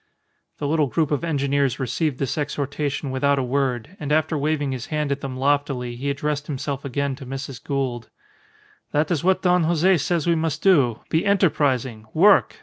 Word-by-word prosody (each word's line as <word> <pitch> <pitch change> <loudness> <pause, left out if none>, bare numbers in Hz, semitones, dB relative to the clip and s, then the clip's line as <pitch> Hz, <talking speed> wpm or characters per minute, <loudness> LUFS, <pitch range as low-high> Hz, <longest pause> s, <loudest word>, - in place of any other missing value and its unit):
The 145 - -3
little 150 -1 +2
group 155 +3 0
of 145 0 0
engineers 140 -4 0
received 135 +2 -1
this 135 - -2
exhortation 145 -1 -2
without 140 +2 +2
a 135 - 0
word, 130 +4 -1
and 150 -1 -4
after 155 +1 +2
waving 145 -1 0
his 130 0 -5
hand 150 -2 -1
at 140 0 -2
them 130 -2 -5
loftily, 135 -3 0
he 135 +4 -3
addressed 145 +1 -2
himself 140 -1 -4
again 140 0 -2
to 135 - -9
Mrs. 135 -1 -6
Gould 130 -4 -3 0.8
"That 150 +4 +1
is 165 -4 0
what 190 +1 +2
Don 180 -2 +3
Jose 175 +3 +3
says 165 +1 0
we 170 - +3
must 160 -2 -2
do. 135 - +4
Be 160 +3 +2
enterprising! 135 - +1
Work! 200 +5 +5
140 Hz, 180 wpm, -23 LUFS, 135-155 Hz, 0.8 s, Work